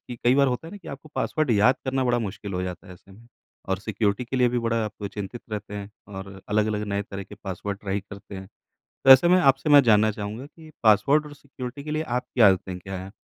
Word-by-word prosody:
कई 120 Hz, +1 st, +1 dB
बार 140 Hz, 0 st, +4 dB
होता 125 Hz, +5 st, -2 dB
है -, -, -9 dB
ना, 205 Hz, -, -7 dB
कि -, -, -12 dB
आपको 140 Hz, +2 st, -9 dB
पासवर्ड 155 Hz, -4 st, 0 dB
याद 115 Hz, +4 st, +4 dB
करना 130 Hz, 0 st, 0 dB
बड़ा 120 Hz, -1 st, +2 dB
मुश्किल 105 Hz, -2 st, -5 dB
हो 90 Hz, -, -1 dB
जाता 90 Hz, 0 st, -6 dB
है 95 Hz, -, -11 dB
ऐसे 95 Hz, -, -21 dB
में 115 Hz, +4 st, -17 dB, 0.4 s
और 95 Hz, -1 st, 0 dB
सिक्योरिटी 105 Hz, +2 st, -1 dB
के 125 Hz, +2 st, -4 dB
लिए 125 Hz, -1 st, +4 dB
भी 120 Hz, 0 st, -1 dB
बड़ा 115 Hz, -1 st, 0 dB
आपको 105 Hz, -1 st, -6 dB
चिंतित 105 Hz, +4 st, -7 dB
रहते 105 Hz, -1 st, -5 dB
हैं 100 Hz, 0 st, -6 dB, 0.2 s
और 95 Hz, -1 st, -9 dB
अलग-अलग 105 Hz, 0 st, 0 dB
नए 100 Hz, -, 0 dB
तरह 100 Hz, 0 st, -7 dB
के 100 Hz, -, -12 dB
पासवर्ड 100 Hz, +1 st, -4 dB
ट्राई 100 Hz, 0 st, -2 dB
करते 100 Hz, 0 st, -12 dB
हैं। 95 Hz, 0 st, -9 dB, 0.6 s
तो -, -, +6 dB
ऐसे 130 Hz, +6 st, +8 dB
मैं 180 Hz, +1 st, +5 dB
आपसे 135 Hz, +3 st, -5 dB
मैं 145 Hz, -1 st, +9 dB
जानना 110 Hz, -2 st, +4 dB
चाहूँगा 105 Hz, +4 st, -6 dB
कि 155 Hz, +2 st, -15 dB
पासवर्ड 125 Hz, +8 st, +4 dB
और 150 Hz, -, -10 dB
सिक्योरिटी 140 Hz, -1 st, -8 dB
के 150 Hz, -, -5 dB
लिए 155 Hz, +1 st, -1 dB, 0.2 s
आपकी 125 Hz, -, -3 dB
आदतें 95 Hz, -1 st, -1 dB
क्या 95 Hz, +2 st, -7 dB
हैं? 95 Hz, +1 st, -9 dB
110 Hz, 240 wpm, -25 LUFS, 100-130 Hz, 0.6 s, मैं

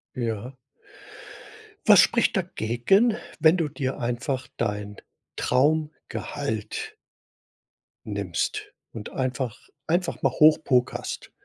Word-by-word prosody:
Ja. 120 Hz, +1 st, -3 dB, 1.3 s
Was -, -, +8 dB
spricht -, -, +2 dB
dagegen, 195 Hz, -, +2 dB, 0.2 s
wenn 160 Hz, +3 st, +5 dB
du 165 Hz, -4 st, 0 dB
dir 135 Hz, -2 st, -3 dB
einfach 125 Hz, +2 st, -2 dB
dein 105 Hz, -2 st, -3 dB, 0.4 s
Traumgehalt 160 Hz, -, -1 dB, 1.1 s
nimmst 425 Hz, -1 st, -3 dB, 0.2 s
und 110 Hz, -2 st, -7 dB
einfach 130 Hz, -3 st, -2 dB, 0.3 s
einfach 175 Hz, +2 st, 0 dB
mal -, -, +2 dB
hoch 155 Hz, 0 st, +5 dB
pokerst, 125 Hz, -2 st, -1 dB
130 Hz, 90 wpm, -25 LUFS, 120-160 Hz, 1.3 s, Was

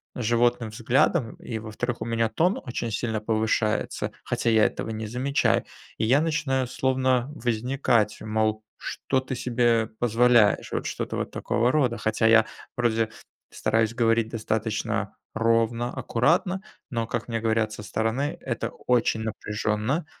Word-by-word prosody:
животным 120 Hz, 0 st, +1 dB
взглядом. 115 Hz, +4 st, +1 dB
И, 110 Hz, -2 st, -6 dB
во-вторых, 115 Hz, +2 st, -4 dB
у -, -, -2 dB
меня 115 Hz, -1 st, +1 dB
тон 180 Hz, -, +1 dB
очень 120 Hz, -2 st, -3 dB
сильно 110 Hz, 0 st, -2 dB
повышается, 110 Hz, 0 st, 0 dB
хотя 120 Hz, -, 0 dB
я 110 Hz, -1 st, +5 dB
этого -, -, -2 dB
не 110 Hz, 0 st, -4 dB
замечаю, 135 Hz, +5 st, +1 dB, 0.3 s
и -, -, 0 dB
я 135 Hz, +6 st, +4 dB
начинаю 135 Hz, -5 st, 0 dB
словно 130 Hz, 0 st, +1 dB
возникать, 120 Hz, -2 st, +1 dB
мол: 110 Hz, 0 st, 0 dB
"Что 130 Hz, -, -2 dB
ты 130 Hz, 0 st, -5 dB
себе 120 Hz, -2 st, +2 dB
позволяешь?" 120 Hz, -2 st, +4 dB
Вот -, -, -2 dB
что-то -, -, -3 dB
вот -, -, -3 dB
такого 120 Hz, +2 st, +1 dB
рода. 130 Hz, -6 st, +2 dB
Хотя 110 Hz, 0 st, 0 dB
я 115 Hz, 0 st, +6 dB, 0.3 s
вроде 115 Hz, -2 st, +1 dB, 0.4 s
стараюсь 110 Hz, 0 st, +1 dB
говорить 115 Hz, -1 st, +2 dB
достаточно 110 Hz, -1 st, -2 dB, 0.2 s
ровно, 115 Hz, +1 st, +1 dB
аккуратно. 160 Hz, +9 st, +1 dB, 0.3 s
Но, 115 Hz, -3 st, -1 dB
как -, -, -3 dB
мне 115 Hz, -1 st, -2 dB
говорят 110 Hz, -1 st, +1 dB
со 105 Hz, -, -8 dB
стороны, 115 Hz, -, -1 dB
это 120 Hz, -4 st, -3 dB
очень 120 Hz, -2 st, 0 dB
напряжённо, 110 Hz, -, -2 dB
115 Hz, 140 wpm, -26 LUFS, 110-125 Hz, 0.4 s, я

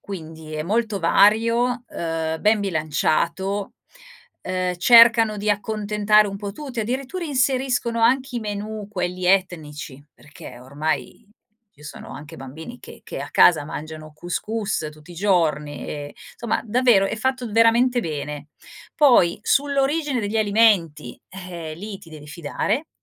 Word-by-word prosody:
Quindi 160 Hz, -4 st, -9 dB
è 155 Hz, -, -2 dB
molto 215 Hz, +2 st, -1 dB
vario 230 Hz, +7 st, +3 dB
uhm, 160 Hz, -1 st, -3 dB
ben 215 Hz, 0 st, +3 dB
bilanciato, 170 Hz, +3 st, -1 dB, 0.7 s
uhm, 185 Hz, -1 st, -2 dB
cercano 230 Hz, +1 st, +6 dB
di 210 Hz, +1 st, -3 dB
accontentare 210 Hz, 0 st, +2 dB
un 195 Hz, -, -6 dB
po' 200 Hz, 0 st, -6 dB
tutti 265 Hz, 0 st, -8 dB
addirittura 265 Hz, -, -3 dB
inseriscono 255 Hz, -4 st, 0 dB
anche 255 Hz, +2 st, +2 dB
i -, -, -2 dB
menù 210 Hz, 0 st, -5 dB
quelli 180 Hz, -2 st, -3 dB
etnici, 155 Hz, -7 st, -1 dB
perché 135 Hz, -4 st, -13 dB
ormai 155 Hz, -, -4 dB, 0.5 s
ci 150 Hz, -, -19 dB
sono -, -, -9 dB
anche 145 Hz, 0 st, -10 dB
bambini 160 Hz, -, -10 dB
che -, -, -13 dB
che -, -, -7 dB
a -, -, -7 dB
casa 160 Hz, -4 st, +5 dB
mangiano 155 Hz, +1 st, -8 dB
cous 175 Hz, +3 st, -4 dB
cous 210 Hz, -7 st, -3 dB
tutti 155 Hz, +3 st, -15 dB
i -, -, -12 dB
giorni 160 Hz, -6 st, 0 dB
e 145 Hz, -1 st, -7 dB, 0.2 s
insomma 235 Hz, -2 st, -1 dB
davvero 230 Hz, -3 st, +3 dB
è 205 Hz, -, -3 dB
fatto 255 Hz, +1 st, -2 dB
veramente 235 Hz, +3 st, +4 dB
bene. 150 Hz, -4 st, -5 dB, 0.5 s
Poi 245 Hz, -, +4 dB
sull'origine 280 Hz, 0 st, +1 dB
degli 205 Hz, +1 st, -2 dB
alimenti, 200 Hz, -, +2 dB
eh, 175 Hz, -4 st, -7 dB
lì 200 Hz, +4 st, -7 dB
ti 165 Hz, -4 st, -16 dB
devi 150 Hz, -1 st, -11 dB
fidare, 165 Hz, -, -3 dB
200 Hz, 140 wpm, -22 LUFS, 160-230 Hz, 0.7 s, cercano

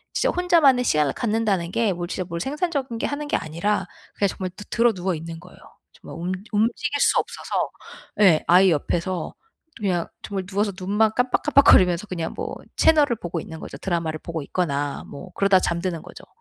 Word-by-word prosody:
진짜 -, -, +2 dB
혼자만의 325 Hz, -8 st, +4 dB
시간을 150 Hz, -6 st, +2 dB
갖는다는 210 Hz, -6 st, 0 dB
게 220 Hz, -4 st, +1 dB
뭘 175 Hz, 0 st, -5 dB
진짜 185 Hz, 0 st, -3 dB
뭘 170 Hz, -1 st, -4 dB
생산적인 280 Hz, -, -2 dB
게 -, -, -1 dB
하는 290 Hz, +1 st, -4 dB
게 -, -, +1 dB
아니라 170 Hz, +7 st, -2 dB, 0.3 s
그냥 200 Hz, -1 st, +1 dB
정말 185 Hz, 0 st, -4 dB
드 205 Hz, +2 st, -11 dB
드러누워 195 Hz, -6 st, +1 dB
있는 165 Hz, +1 st, -7 dB
거예요. -, -, -16 dB, 0.4 s
정말 -, -, -11 dB
움 180 Hz, +2 st, -3 dB, 0.2 s
움직일 235 Hz, +7 st, 0 dB
수 -, -, +4 dB
없어서. -, -, -3 dB, 0.5 s
예 175 Hz, -6 st, +5 dB
아이 180 Hz, +1 st, +6 dB
옆에서 170 Hz, +3 st, -2 dB, 0.4 s
또 -, -, -14 dB
그냥 180 Hz, -4 st, 0 dB, 0.2 s
정말 195 Hz, -2 st, -4 dB
누워서 200 Hz, +1 st, 0 dB
눈만 210 Hz, +3 st, +2 dB
깜빡 250 Hz, 0 st, +1 dB
깜빡거리면서 185 Hz, -8 st, +5 dB
그냥 170 Hz, -3 st, -4 dB
뭐 -, -, -5 dB, 0.2 s
채널을 295 Hz, -6 st, +4 dB
보고 175 Hz, -3 st, -4 dB
있는 160 Hz, -1 st, -9 dB
거죠. -, -, -8 dB
드라마를 165 Hz, -4 st, -2 dB
보고 165 Hz, -2 st, -4 dB
있거나 145 Hz, -4 st, -2 dB
뭐 180 Hz, +5 st, -10 dB
그러다 200 Hz, -1 st, +4 dB
잠드는 170 Hz, -1 st, -2 dB
거죠. -, -, -13 dB
190 Hz, 390 characters per minute, -23 LUFS, 170-230 Hz, 0.5 s, 아이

